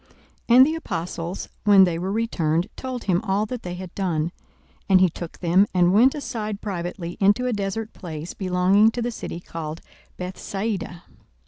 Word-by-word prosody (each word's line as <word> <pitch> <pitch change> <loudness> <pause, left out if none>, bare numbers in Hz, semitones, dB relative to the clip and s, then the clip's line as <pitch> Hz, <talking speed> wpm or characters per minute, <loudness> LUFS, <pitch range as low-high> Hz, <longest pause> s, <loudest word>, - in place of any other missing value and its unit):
42:009:010 235 - +6
And 260 - +10
the 310 - 0
apostles, 175 - -4
when 200 -2 +7
they 170 -3 +1
were 185 +2 -2
returned, 180 -6 0
told 255 -2 -5
him 185 -2 +1
all 205 -1 0
that 245 +2 -5
they 180 0 -5
had 180 -1 -8
done. 170 -4 -1 0.6
And 190 -1 +6
he 185 -2 +4
took 170 0 -8
them, 185 +3 +3
and 180 0 +4
went 245 +7 +5
aside 215 -8 -4
privately 175 -3 -5
into 205 +5 +3
a 250 - 0
desert 205 +2 -3
place 165 -2 -7
belonging 190 +3 +3
to 240 - -2
the 240 - -1
city 175 - -6
called 160 -2 -6 0.4
Bethsaida. 190 0 -4
190 Hz, 175 wpm, -24 LUFS, 175-215 Hz, 0.6 s, And